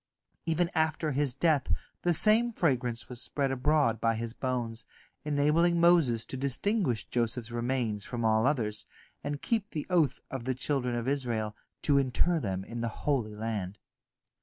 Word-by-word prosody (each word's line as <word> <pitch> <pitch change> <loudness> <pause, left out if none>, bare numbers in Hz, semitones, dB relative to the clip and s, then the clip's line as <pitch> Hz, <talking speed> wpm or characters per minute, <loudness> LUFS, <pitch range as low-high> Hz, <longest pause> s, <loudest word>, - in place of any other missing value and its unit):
Even 170 +1 +1
after 160 -1 +1
his 135 -2 0
death 150 -2 +2 0.4
the 175 - +2
same 220 +7 +4
fragrance 125 - 0
was 125 -2 -2
spread 140 -2 0
abroad 135 -3 +2
by 115 0 +2
his 115 0 -4
bones, 120 -3 -3 0.4
enabling 150 +4 +2
Moses 165 -10 +4
to - - -6
distinguish 140 - 0
Joseph's 120 0 -1
remains 120 -3 -1
from 115 0 -3
all 110 +2 +3
others, 110 -7 -1 0.4
and 145 0 -4
keep 220 -3 0
the 155 -6 -4
oath 165 -6 +3
of 130 -3 -5
the 130 0 0
children 130 -2 -1
of 120 +1 -3
Israel, 120 -6 -1 0.3
to 140 -2 +4
inter 140 +6 +1
them 95 -7 -3
in 115 +3 -6
the 115 - -1 0.2
Holy 120 -8 0
Land. 105 -3 -3
130 Hz, 160 wpm, -30 LUFS, 115-155 Hz, 0.4 s, same